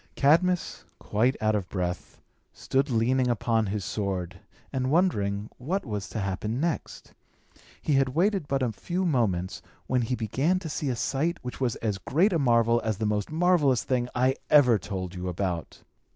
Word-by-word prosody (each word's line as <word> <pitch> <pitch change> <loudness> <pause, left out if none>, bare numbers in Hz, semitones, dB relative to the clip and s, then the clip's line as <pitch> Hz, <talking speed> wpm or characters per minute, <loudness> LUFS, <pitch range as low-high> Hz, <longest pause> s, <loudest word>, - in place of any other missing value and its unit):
Cadmus, 170 +5 +2
quite 120 +6 0
out 110 0 +2
of 100 -4 -2
breath, 90 -2 -4 0.3
stood 135 +2 -1
leaning 125 +2 +2
upon 115 -2 +1
his 100 -1 -3
sword, 95 -3 -3 0.3
and 130 -1 0
wondering 105 - +1
what 170 +9 -2
was 105 -5 -4
to 110 - -4
happen 100 +4 -2
next. 165 +1 -3 0.7
He 150 - +1
had 135 -1 +3
waited 190 -2 +1
but 135 -1 0
a 120 - 0
few 175 - -3
moments, 105 - 0 0.2
when 125 -1 +1
he 120 +2 -1
began 135 - 0
to 180 -3 -5
see 145 -1 -2
a 125 - 0
sight, 155 +8 -1
which 125 +1 -7
was 125 -4 +1
as 105 -3 -1
great 175 - +2
a 165 - +2
marvel 115 -3 +3
as 110 -3 -1
the 110 - -2
most 105 -1 -1
marvellous 160 -6 +3
thing 125 -2 -1
I 130 +2 +2
ever 125 -7 +6
told 95 -1 -5
you 90 0 -5
about. 90 -2 -3
120 Hz, 175 wpm, -27 LUFS, 105-145 Hz, 0.7 s, ever